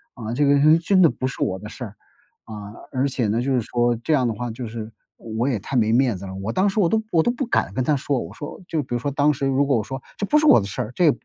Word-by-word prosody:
啊， 115 Hz, -1 st, -5 dB
这 145 Hz, -, +2 dB
个 140 Hz, 0 st, +4 dB
呃， 155 Hz, +3 st, +6 dB
真 185 Hz, +3 st, +3 dB
的 170 Hz, -, +7 dB
不 130 Hz, -, -4 dB
是 130 Hz, -, -4 dB
我 95 Hz, -, 0 dB
的 105 Hz, +3 st, -9 dB
事 120 Hz, -, -7 dB
儿， 105 Hz, -1 st, -11 dB, 0.5 s
啊， 105 Hz, -1 st, -9 dB, 0.2 s
而 130 Hz, +2 st, 0 dB
且 125 Hz, -4 st, -1 dB
呢， 115 Hz, +3 st, +1 dB
就 135 Hz, +2 st, 0 dB
是 125 Hz, -, +2 dB
说 120 Hz, +1 st, 0 dB
这 160 Hz, -, -1 dB
样 130 Hz, -4 st, +3 dB
的 115 Hz, -, -1 dB
话， 120 Hz, +2 st, -4 dB
就 120 Hz, +1 st, -6 dB
是 110 Hz, 0 st, -7 dB, 0.2 s
我 115 Hz, +2 st, -3 dB
也 130 Hz, -5 st, +1 dB
太 130 Hz, +7 st, -3 dB
没 110 Hz, -1 st, +2 dB
面 125 Hz, -4 st, +2 dB
子 95 Hz, -, -8 dB
了， 95 Hz, 0 st, -7 dB
我 95 Hz, +3 st, -4 dB
当 190 Hz, -, +2 dB
时 205 Hz, +2 st, 0 dB
我 170 Hz, -, +3 dB
都 220 Hz, +3 st, +2 dB
我 165 Hz, -2 st, +4 dB
都 240 Hz, -, +2 dB
不 260 Hz, +2 st, -3 dB
敢 -, -, 0 dB
跟 130 Hz, -, -1 dB
他 145 Hz, +4 st, +2 dB
说， 140 Hz, 0 st, -1 dB
我 85 Hz, 0 st, -7 dB
说 145 Hz, -, -8 dB
就 155 Hz, -3 st, -1 dB
比 125 Hz, -, -7 dB
如 120 Hz, -, 0 dB
说 145 Hz, -, -2 dB
当 145 Hz, +2 st, +2 dB
时 135 Hz, 0 st, -3 dB
如 135 Hz, +1 st, +2 dB
果 135 Hz, -3 st, +2 dB
我 110 Hz, -, 0 dB
说 135 Hz, +5 st, -6 dB, 0.2 s
“这 205 Hz, -, 0 dB
不 300 Hz, +9 st, +3 dB
是 310 Hz, -, +3 dB
我 300 Hz, -, +7 dB
的 100 Hz, -, -4 dB
事”， 120 Hz, +3 st, -4 dB
这 180 Hz, -, +3 dB
也 155 Hz, -, +7 dB
130 Hz, 340 characters per minute, -22 LUFS, 110-145 Hz, 0.5 s, 的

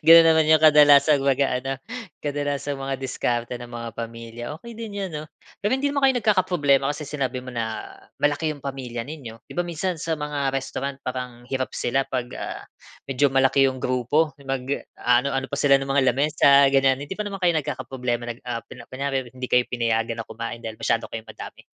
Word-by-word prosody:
Gano'n 165 Hz, 0 st, +9 dB
naman 160 Hz, -1 st, +5 dB
'yong 155 Hz, -, +6 dB
kadalasang 145 Hz, -2 st, +6 dB
mag-aano, 135 Hz, -1 st, +1 dB, 0.4 s
kadalasang 145 Hz, -1 st, -2 dB
mga 135 Hz, 0 st, -3 dB
diskarte 125 Hz, -2 st, -2 dB
ng 120 Hz, 0 st, -10 dB
mga 115 Hz, 0 st, -5 dB
pamilya. 115 Hz, 0 st, -7 dB, 0.2 s
Okey 235 Hz, -1 st, -10 dB
din 215 Hz, -3 st, -6 dB
'yan 195 Hz, -, -2 dB
'no, 150 Hz, -, -5 dB, 0.4 s
pero 205 Hz, -, +2 dB
hindi 265 Hz, +2 st, +1 dB
naman 280 Hz, -1 st, 0 dB
kayo 265 Hz, -, +5 dB
nagkakaproblema 175 Hz, -, +2 dB
kasi 150 Hz, -1 st, -7 dB
sinabi 130 Hz, -3 st, -2 dB
mo 130 Hz, -, -11 dB
na 115 Hz, -2 st, -4 dB, 0.3 s
malaki 145 Hz, +2 st, +1 dB
'yong 145 Hz, -, -12 dB
pamilya 130 Hz, -4 st, -5 dB
ninyo, 115 Hz, -4 st, -9 dB
'di -, -, -11 dB
ba 175 Hz, -, +1 dB
minsan 175 Hz, +1 st, -2 dB
sa 165 Hz, +1 st, -3 dB
mga 145 Hz, -3 st, -2 dB
restaurant 135 Hz, 0 st, -3 dB
parang 125 Hz, -2 st, -6 dB
hirap 130 Hz, -1 st, -2 dB
sila 135 Hz, +3 st, 0 dB
'pag, 125 Hz, -2 st, -3 dB
ah, -, -, -5 dB, 0.5 s
medyo 135 Hz, +1 st, +2 dB
malaki 135 Hz, +1 st, +4 dB
'yong 130 Hz, -1 st, 0 dB
grupo, 135 Hz, +4 st, +1 dB
mag 135 Hz, -1 st, -2 dB, 0.4 s
aano 125 Hz, +3 st, +3 dB
ano 135 Hz, 0 st, -2 dB
pa 140 Hz, -, -4 dB
sila 140 Hz, -1 st, +4 dB
ng 135 Hz, -, -5 dB
mga 135 Hz, -1 st, +3 dB
lamis 150 Hz, +4 st, 0 dB
sa 140 Hz, 0 st, +7 dB
ganyan. 135 Hz, -1 st, +3 dB
Hindi 145 Hz, +7 st, -6 dB
pa 210 Hz, -, -2 dB
naman 195 Hz, -1 st, -5 dB
kayo 175 Hz, -3 st, +3 dB
nagkakaproblema 130 Hz, -4 st, -3 dB
nag 120 Hz, +1 st, -7 dB
ah 120 Hz, -2 st, -3 dB
apel 115 Hz, 0 st, -12 dB
kunyari 135 Hz, 0 st, -1 dB
hindi 130 Hz, 0 st, -6 dB
kayo 125 Hz, 0 st, +4 dB
pinayagan 115 Hz, -1 st, 0 dB
na 115 Hz, -, -8 dB
kumain 115 Hz, +1 st, -6 dB
dahil 110 Hz, -2 st, -6 dB
masyado 115 Hz, +1 st, 0 dB
kayong 115 Hz, -1 st, -6 dB
madami? -, -, -10 dB
135 Hz, 195 wpm, -24 LUFS, 125-150 Hz, 0.5 s, Gano'n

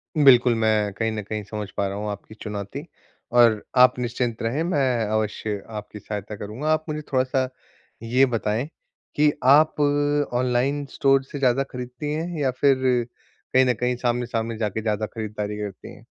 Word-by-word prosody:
बिल्कुल, 125 Hz, -5 st, +6 dB
मैं 110 Hz, -2 st, +1 dB
कहीं 110 Hz, +2 st, -1 dB
न 110 Hz, -, -3 dB
कहीं 105 Hz, +1 st, -4 dB
समझ 105 Hz, 0 st, -6 dB
पा 100 Hz, -, +1 dB
रहा 100 Hz, -, -4 dB
हूँ 105 Hz, 0 st, -3 dB
आपकी 100 Hz, +2 st, -9 dB
चुनौती, 100 Hz, -2 st, -5 dB, 0.5 s
और 115 Hz, -3 st, +5 dB
आप 125 Hz, 0 st, +6 dB
निश्चिंत 120 Hz, -1 st, -2 dB
रहें, 130 Hz, +8 st, 0 dB
मैं 130 Hz, -9 st, +1 dB
अवश्य 105 Hz, -1 st, -2 dB
आपकी 105 Hz, -1 st, -7 dB
सहायता 105 Hz, 0 st, -6 dB
करूँगा। 110 Hz, +9 st, -5 dB
आप 155 Hz, 0 st, -1 dB
मुझे 150 Hz, 0 st, -3 dB
थोड़ा-सा 130 Hz, 0 st, +1 dB, 0.6 s
ये 125 Hz, +4 st, +4 dB
बताएँ 115 Hz, +1 st, -1 dB, 0.5 s
कि 150 Hz, 0 st, +4 dB
आप 150 Hz, +4 st, +6 dB, 0.6 s
ऑनलाइन 125 Hz, +3 st, +1 dB
स्टोर 135 Hz, -1 st, +3 dB
से 140 Hz, +1 st, -8 dB
ज़्यादा 130 Hz, 0 st, +3 dB
खरीदती 125 Hz, +4 st, -5 dB
हैं, 165 Hz, +2 st, -3 dB
या 135 Hz, -3 st, +1 dB
फिर 135 Hz, +2 st, +3 dB, 0.8 s
कहीं 130 Hz, 0 st, +6 dB
न 125 Hz, -, +3 dB
कहीं 125 Hz, +2 st, -1 dB
सामने-सामने 120 Hz, -2 st, -2 dB
जाके 110 Hz, 0 st, -2 dB
ज़्यादा 110 Hz, -1 st, -1 dB
खरीदारी 105 Hz, -1 st, -5 dB
करती 100 Hz, -3 st, -7 dB
हैं? -, -, -18 dB
120 Hz, 165 wpm, -24 LUFS, 105-130 Hz, 0.8 s, बिल्कुल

